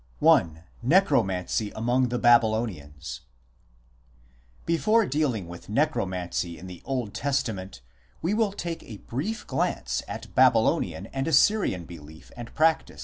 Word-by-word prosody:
I. - - +7 0.4
NECROMANCY 110 - +2
AMONG 120 +3 +1
THE 125 - -1
BABYLONIANS 110 - +1 1.5
Before 215 +7 +3
dealing 130 - -1
with 85 +3 -11
Necromancy 95 - -1
in 95 - -11
the 90 -2 -10
Old 125 -6 -3
Testament 110 - -2 0.4
we 175 +5 -1
will 215 -2 +1
take 170 -4 -5
a 110 - -10
brief 170 - -4
glance - - -1
at - - -8
Babylonian - - +3
and 135 +2 -2
Assyrian 160 - +3
belief 80 -2 -13
and 120 -1 -8
practice. 160 0 +1
120 Hz, 120 wpm, -26 LUFS, 95-155 Hz, 1.5 s, I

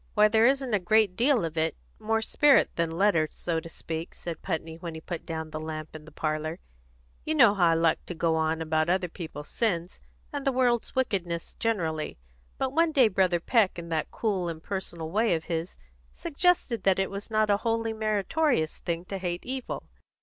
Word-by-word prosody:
"Why, 210 0 +6
there 220 +2 +4
isn't 265 -3 +1
a 205 - +4
great 200 +1 +3
deal 245 -2 +3
of 160 0 -3
it 160 0 0 0.2
more 225 +1 0
spirit 290 +4 +4
than 170 -1 0
letter, 165 -2 +2
so 165 -2 -2
to 165 - -10
speak," 165 +1 -6
said 170 -2 -6
Putney, 160 -3 -3
when 170 -2 -6
he - - -6
put 170 +1 -6
down 160 -1 -4
the 155 - -4
lamp 155 0 -6
in 155 -1 -9
the 160 - -13
parlour. 155 +2 -2 0.7
"You 315 - -1
know 235 -8 +7
how 180 -4 +3
I 165 - +4
like 165 0 +2
to 175 - -5
go 165 0 +1
on 160 0 0
about 155 +1 +1
other 180 0 +2
people's 160 -3 -8
sins, 180 -6 -1 0.3
and 285 -1 -3
the 275 - +2
world's 245 -2 +1
wickedness 180 -10 -1
generally; 165 -9 -1 0.4
but 265 0 -1
one 330 +1 +3
day 260 -7 +5
Brother 185 -3 +2
Peck, 205 +1 +2
in 170 -1 -7
that 160 -2 -1
cool, 195 -6 -1
impersonal 165 -1 -5
way 215 -1 +2
of 160 - -4
his, 165 +1 -4 0.3
suggested 335 -7 +1
that 195 -1 +3
it 195 0 0
was 200 +2 -6
not 215 -1 +2
a 200 - +4
wholly 225 0 -1
meritorious 215 - 0
thing 170 0 -3
to 195 +1 -5
hate 175 -1 -3
evil. 260 0 -4
180 Hz, 200 wpm, -27 LUFS, 165-225 Hz, 0.7 s, know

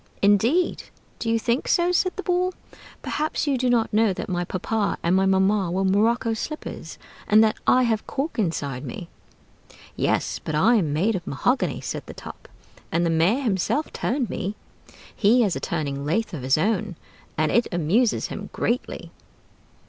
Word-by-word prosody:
"Indeed! 225 - +3 0.3
Do 225 - -2
you 230 - +3
think 235 +4 -1
so?" 350 0 +3
said 365 +1 +1
the 390 - -5
Ball. 365 0 0 0.5
"Perhaps 310 +1 -1
you 285 -2 +1
do 255 0 0
not 235 -3 +1
know 215 -2 +3
that - - -5
my 175 -1 -1
papa 200 +4 -1
and 170 +2 +2
my 190 0 +3
mamma 190 0 +2
were 190 +3 0
morocco 225 +4 +2
slippers, 305 +7 -6 0.3
and 215 +1 +6
that 215 -1 +1
I 255 - +5
have 225 -3 +1
a - - -33
cork 280 -1 -3
inside 145 - -2
me?" 200 -7 -7 0.9
"Yes, - - 0
but 155 - -3
I 220 +11 +4
am 165 -8 0
made 190 +9 +1
of 175 - -5
mahogany," 250 - 0
said - - -4
the - - -9
Top; - - -10 0.4
"and 170 +1 +1
the 165 - +1
mayor 180 +12 +2
himself 230 - 0
turned 255 -1 -1
me. 200 +1 -4 0.6
He 230 +4 +4
has 195 -6 0
a - - -3
turning 140 -4 -3
lathe 180 +10 -1
of 150 - -5
his 130 +3 +2
own, 205 +2 0 0.4
and 155 0 +1
it 235 - +3
amuses 195 +8 +1
him - - -7
greatly." 245 +4 -2
215 Hz, 180 wpm, -24 LUFS, 175-245 Hz, 0.9 s, and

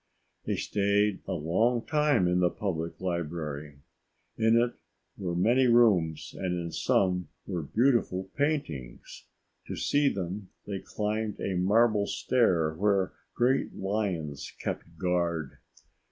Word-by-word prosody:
They - - 0
stayed 100 0 +1
a - - -1
long 110 +9 +1
time 150 - +2
in 90 0 +2
the 90 -1 +4
Public 85 -5 -4
Library. 75 -5 -4 0.5
In 115 +1 +4
it 120 0 +1 0.4
were 90 -3 -3
many 120 +8 +4
rooms 90 -10 +3
and 90 -2 -2
in 85 -1 -4
some 90 -2 +1 0.2
were 90 -4 -3
beautiful 95 - +1
paintings. 110 - -3 0.4
To - - -4
see 145 -1 +2
them, 95 +1 -5 0.2
they 100 -2 -4
climbed 105 +2 -3
a 95 - -2
marble 105 +3 +3
stair 85 -11 +2
where 95 +2 +1 0.2
great 130 +3 +1
lions 95 -8 -2
kept 85 -1 -5
guard. 85 -4 -1
95 Hz, 125 wpm, -29 LUFS, 85-110 Hz, 0.5 s, the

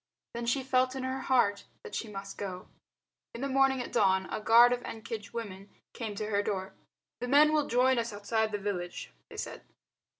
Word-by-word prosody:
Then 235 0 -4
she 265 +3 +1
felt 255 0 +2
in 265 - -4
her 260 +1 -2
heart 205 -7 +2 0.2
that 450 - -10
she 230 - -3
must 195 -1 -7
go. 185 -2 -5 0.7
In 235 - -6
the 275 - -1
morning 270 -1 +3
at - - -9
dawn 190 -1 +3
a - - -3
guard 235 +3 +7
of 245 - -2
Ekenge 220 -1 -6
women 200 -4 -6 0.2
came 220 -3 -5
to 215 +1 -4
her 200 0 +2
door. 195 -2 -3 0.5
"The 245 - -3
men 295 +4 +6
will 300 -2 +2
join 250 +1 +3
us 230 0 -2
outside 215 +2 -1
the 205 - -1
village," 190 -3 -4 0.2
they - - -11
said. - - -5
230 Hz, 200 wpm, -30 LUFS, 205-255 Hz, 0.7 s, guard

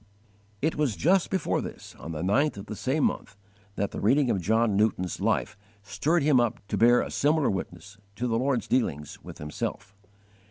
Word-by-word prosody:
It 160 - 0
was 145 -8 +1
just 180 - +2
before 190 -5 0
this, - - -9
on 85 - -7
the 80 +1 -4
ninth 130 +8 +2
of 100 - -7
the 110 - -6
same 135 +7 -1
month, 105 - -2 0.4
that 100 - -2
_the - - -5
reading 130 +4 +3
of 95 - 0
John 110 +2 +2
Newton's 100 -4 0
Life - - 0 0.3
stirred 155 - 0
him 140 -3 +4
up 120 0 0
to - - -1
bear 120 +4 +5
a - - -5
similar 150 -1 +2
witness 95 +1 -6 0.2
to 120 - -3
the 115 -2 0
Lord's 130 -1 0
dealings 75 - -1
with - - -10
himself. 75 +5 -5
115 Hz, 190 wpm, -27 LUFS, 100-140 Hz, 0.4 s, bear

